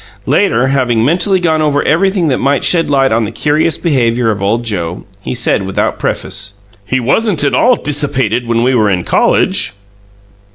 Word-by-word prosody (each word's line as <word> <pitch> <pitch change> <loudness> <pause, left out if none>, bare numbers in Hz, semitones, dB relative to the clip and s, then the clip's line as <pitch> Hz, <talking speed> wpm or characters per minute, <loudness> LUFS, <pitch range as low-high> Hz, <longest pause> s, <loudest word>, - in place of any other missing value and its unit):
Later, 120 +3 +1
having 125 -4 +1
mentally 180 +6 +1
gone 160 -3 0
over 145 -2 +1
everything 185 +2 +1
that 130 - 0
might 140 0 0
shed 165 -3 +2
light 135 -3 +2
on 115 +1 +1
the 105 - -3
curious 150 +6 0
behaviour 120 -7 0
of 100 -2 -4
old 110 +4 0
Joe, 90 -6 -4 0.2
he 115 - -5
said, 115 -3 0
without 95 0 -2
preface: 100 +1 -3 0.3
"He 130 +4 0
wasn't 170 - +1
at 140 - +1
all 250 +1 +3
dissipated 140 - -1
when 115 0 0
we 130 +2 +2
were 110 -4 +2
in 90 -3 -1
college." - - +1
130 Hz, 175 wpm, -13 LUFS, 115-155 Hz, 0.3 s, all